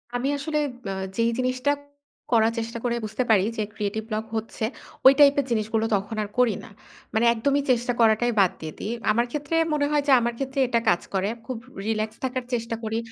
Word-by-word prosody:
আমি 245 +3 0
আসলে 300 +2 -2 0.3
অ্যা - - -2 0.3
যেই 230 0 +3
জিনিসটা 255 +2 +1 0.6
করার 225 -1 +4
চেষ্টা 230 +1 -4
করে 235 -1 0
বুঝতে 220 +4 -2
পারি 205 -4 +5
যে 215 - 0
ক্রিয়েটিভ 210 0 -3
ব্লক 215 +1 -2
হচ্ছে 220 0 -4 0.4
ঐ - - +11
টাইপ 280 -1 +8
এর 275 - +1
জিনিসগুলো 220 0 0
তখন 200 +3 -3
আর 205 - -7
করি 240 -5 +3
না। - - -11 0.4
মানে 220 +2 +2
একদমই 280 +5 +1
চেষ্টা 245 0 +1
করাটাই 230 +2 +4
বাদ 190 -3 +5
দিয়ে 155 -1 -6
দেই। 215 - -3 0.2
আমার 235 +3 +2
ক্ষেত্রে 295 +2 -2 0.2
মনে 290 -1 +2
হয় 295 - +3
যে, - - +4
আমার 235 0 -1
ক্ষেত্রে 270 0 -3
এটা 235 -1 +2
কাজ 175 0 +3
করে। 195 +1 +1 0.2
খুব 255 -2 -4 0.3
রিল্যাক্স 220 0 -1
থাকার 255 0 -2
চেষ্টা 230 -1 -1
করি। 220 0 -2
230 Hz, 200 wpm, -25 LUFS, 220-255 Hz, 0.6 s, ঐ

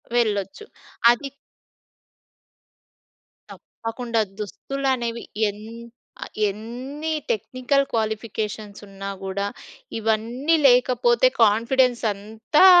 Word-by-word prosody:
వెళ్ళొచ్చు 210 - 0 0.5
అది 275 +3 -2 2.2
తప్పకుండా. 230 0 -3 0.2
దుస్తులనేవి 240 +2 -2 0.3
ఎన్ 205 +1 -9 0.6
ఆహ్, - - -7 0.2
ఎన్ని 250 +9 -5 0.2
టెక్నికల్ 255 +5 0
క్వాలిఫికేషన్స్ 215 -2 -3
ఉన్నా 195 0 -7
గూడా, 195 +1 -2 0.5
ఇవన్నీ 230 +8 +1
లేకపోతే 255 - +4 0.2
కాన్ఫిడెన్స్ 235 +3 +3
అంతా 220 - +2
230 Hz, 70 wpm, -23 LUFS, 210-260 Hz, 2.2 s, లేకపోతే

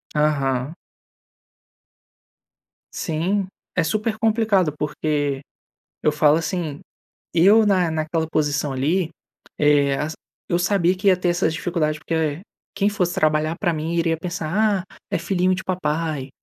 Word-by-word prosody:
Aham. 140 -1 +1 2.2
Sim, 180 +5 -1 0.3
é 180 - +3
super 215 +6 -1
complicado, 215 -7 +2
porque 150 -2 -1 0.6
eu 150 - +4
falo 150 +1 +4
assim, 165 -3 -3 0.5
eu 205 +6 +6
na 185 -5 +2
naquela 160 0 -1
posição 145 -2 0
ali, 160 +6 0 0.5
eh, 145 -2 +4
as 155 +2 -2 0.4
eu 175 - +2
sabia 185 -1 +2
que 200 +2 -2
ia 185 -2 +6
ter 180 -1 0
essas 175 -2 +1
dificuldade, 155 -3 -1
porque, 165 - -5
eh, 155 0 -1 0.3
quem 200 +1 +2
fosse 180 -4 -1
trabalhar 155 +1 +1
pra 175 -5 +1
mim 160 +2 -3
iria 165 -1 +1
pensar: 185 +4 0
"Ah, - - -19
é - - +1
filhinho 185 +1 +1
de 185 - -6
papai! 155 -5 -2
165 Hz, 135 wpm, -22 LUFS, 150-185 Hz, 2.2 s, eu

